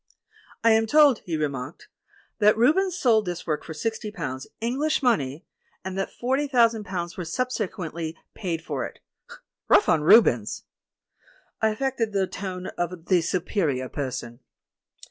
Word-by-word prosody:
"I 230 - +6
am 220 0 +3
told," 290 -2 +5
he 165 -2 -1
remarked, 140 -4 -4 0.5
"that 210 +1 +5
Rubens 355 +10 +3
sold 225 - +3
this 175 -1 -4
work 155 -3 -2
for 160 - -8
sixty 220 +5 -3
pounds, 150 - -5
English 275 +7 0
money, 155 - +1 0.4
and 190 0 -4
that 195 0 -2
forty 265 +4 -1
thousand 230 -5 +3
pounds 175 -2 -4
were 180 - -3
subsequently 170 -6 -3 0.2
paid 170 -5 -4
for - - -3
it. - - -7 0.7
Kough - - +5
on 160 - +3
Rubens!" 150 - +4 1.0
I 220 - +4
affected 225 -1 -1
the 195 -1 +2
tone 185 -1 -6
of 175 -1 -3
the 180 -1 +3
Superior 165 - -1
Person. 125 -4 -5
190 Hz, 145 wpm, -25 LUFS, 160-230 Hz, 1.0 s, I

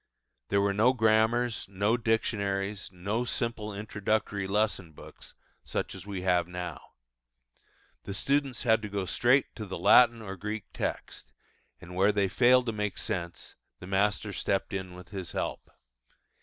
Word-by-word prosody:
There 100 - +3
were 100 0 +2
no 115 +6 +4
grammars, 110 +1 +2
no 100 +4 +1
dictionaries, 100 -3 -1
no 100 +6 -2
simple 115 -3 -2
introductory 105 -1 -2
lesson 100 -5 0
books, - - -13 0.3
such - - -3
as - - -10
we 95 -3 -4
have 90 -2 +2
now. 90 0 -6 1.2
The 100 - -5
students 140 +3 0
had 110 -2 +4
to 105 - -5
go 100 -1 -2
straight 125 +8 +3
at 110 -5 -7
the - - -4
Latin 115 +6 +6
or 95 -3 -6
Greek 105 +2 -4
text, - - -4 0.5
and 90 -1 -11
where 95 +3 +4
they 100 -2 +1
failed 125 +2 +5
to 115 - 0
make 105 -2 -3
sense, 85 -2 -4 0.2
the - - -9
master 100 +2 0
stepped 95 +1 -1
in 95 -2 -4
with 90 -2 -12
his 95 -3 -6
help. - - -3
105 Hz, 155 wpm, -29 LUFS, 95-110 Hz, 1.2 s, Latin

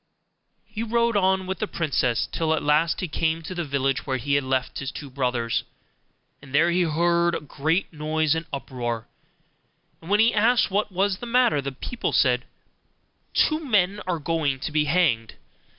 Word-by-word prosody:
He 215 +1 -6
rode 235 0 +1
on 190 -1 +2
with 190 -1 -4
the - - -1
princess, 130 -7 0
till 160 -1 +1
at - - -3
last 150 +3 +2
he 185 - -2
came 160 +1 -1
to 185 - -6
the 175 -1 -3
village 135 -2 -1
where 130 -1 0
he 140 +3 -2
had 140 0 +3
left 130 0 -1
his 140 0 -4
two 140 -1 -9
brothers. 125 -3 -1 0.8
And 140 -1 -8
there 170 +3 +4
he 180 +1 +2
heard 170 +1 +2
a - - -2
great 155 +5 -1
noise 155 0 0
and 160 +1 -3
uproar; 120 -4 -4 0.9
and 165 - -11
when 205 +1 +3
he 225 +2 +5
asked 225 0 +3
what 205 +1 0
was 190 +1 0
the 240 - -7
matter, 235 - +3
the 140 0 -4
people 230 - -4
said, 125 -2 +3 0.9
'Two 310 0 +3
men 205 -6 +1
are 180 -2 0
going 150 -3 -1
to - - -3
be 150 0 +2
hanged. 140 -9 +1
160 Hz, 180 wpm, -24 LUFS, 140-190 Hz, 0.9 s, he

